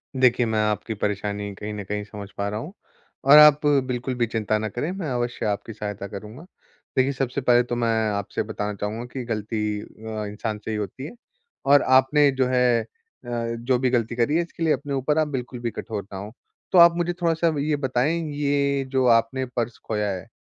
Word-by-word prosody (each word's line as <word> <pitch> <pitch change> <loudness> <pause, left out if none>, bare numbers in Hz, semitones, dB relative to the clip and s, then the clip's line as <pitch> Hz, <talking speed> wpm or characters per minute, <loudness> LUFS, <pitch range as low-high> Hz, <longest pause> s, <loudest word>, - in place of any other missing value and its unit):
देखिए, 125 -2 +4
मैं 110 -1 0
आपकी 105 +1 -1
परेशानी 100 0 -3
कहीं 105 +2 -6
न 105 -1 -5
कहीं 105 +2 -3
समझ 100 -1 -9
पा 100 - -1
रहा 105 +1 -3
हूँ, 160 - -8 0.5
और 140 +3 +8
आप 150 0 +8
बिल्कुल 130 -3 +1
भी 120 - +1
चिंता 110 -1 0
ना 110 0 -3
करें, 125 - -3
मैं 185 -6 -4
अवश्य 120 -1 -2
आपकी 105 +2 -2
सहायता 105 -1 -5
करूँगा। 105 - -9 0.5
देखिए, 130 +1 +3
सबसे 135 0 -2
पहले 120 -1 +4
तो 120 0 -3
मैं 120 -1 0 0.3
आपसे 100 - -3
बताना 105 -1 -4
चाहूँगा 105 +4 -4
कि 130 - -4
गलती 105 -2 -2
अ, 110 -1 -7
इंसान 105 +1 -4
से 110 - -3
ही 110 - -2
होती 105 +6 -5
है। - - -7 0.6
और 145 +1 +7
आपने 135 +3 +4
जो 130 -1 +1
है 125 -2 +3
अ, - - -8 0.4
जो 120 +1 -1
भी 130 0 +2
गलती 120 -2 0
करी 125 +5 +1
है, 170 - +3
इसके 170 0 -6
लिए 160 -2 +4
अपने 140 +1 -4
ऊपर 135 +3 0
आप 155 -1 +2
बिल्कुल 125 -3 -5
भी 120 -1 -3
कठोर 110 -4 -5
ना - - -5
हों। 100 +3 -7 0.4
तो 185 - +3
आप 170 0 +8
मुझे 175 0 0
थोड़ा-सा 165 0 +2
अब 160 -2 0
ये 150 +1 +1
बताएँ, 140 +3 0
ये 140 -1 +1
जो 130 -1 +2
आपने 130 +4 -1
पर्स 120 -1 -2
खोया 105 -2 -1
है, 90 -2 -6
120 Hz, 210 wpm, -24 LUFS, 105-140 Hz, 0.6 s, और